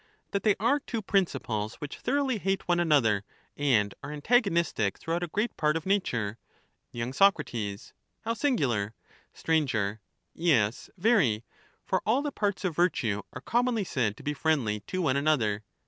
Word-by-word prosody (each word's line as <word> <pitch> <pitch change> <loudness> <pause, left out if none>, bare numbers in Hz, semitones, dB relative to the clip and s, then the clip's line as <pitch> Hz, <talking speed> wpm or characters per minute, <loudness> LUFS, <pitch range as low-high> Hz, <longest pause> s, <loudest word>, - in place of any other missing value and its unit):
That 200 - 0
they 210 -3 +3
are 245 +8 +3
two 230 -5 -5
principles 135 - -1
which 145 -1 -7
thoroughly 265 -2 0
hate 195 0 -1
one 175 -1 +2
another 130 - +3 0.3
and 115 -9 +2
are 145 - -6
antagonistic 170 - +1
throughout 165 +2 -2
a 175 - -2
great 210 +8 -1
part 155 +1 +2
of 165 - -7
nature. 120 - 0 0.5
y 120 +1 -3
Soc. 195 +8 +5 0.8
How 225 +1 -1
singular 130 - 0 0.5
I 160 -2 +4
Sir. 105 -3 -1 0.3
Yes, 130 -10 +1
very 175 - +3 0.2
— - - -36
for - - 0
all 250 +7 +2
the 290 - -2
parts 205 -5 -1
of 175 -4 -1
virtue 125 - +1
are 125 - -8
commonly 240 - +1
Common - - -8
said 110 -6 0
to - - -12
be 150 - -1
friendly 140 -9 0
to 185 -1 -2
one 140 -4 +2
another. 120 -9 +1
160 Hz, 165 wpm, -28 LUFS, -, 0.8 s, Soc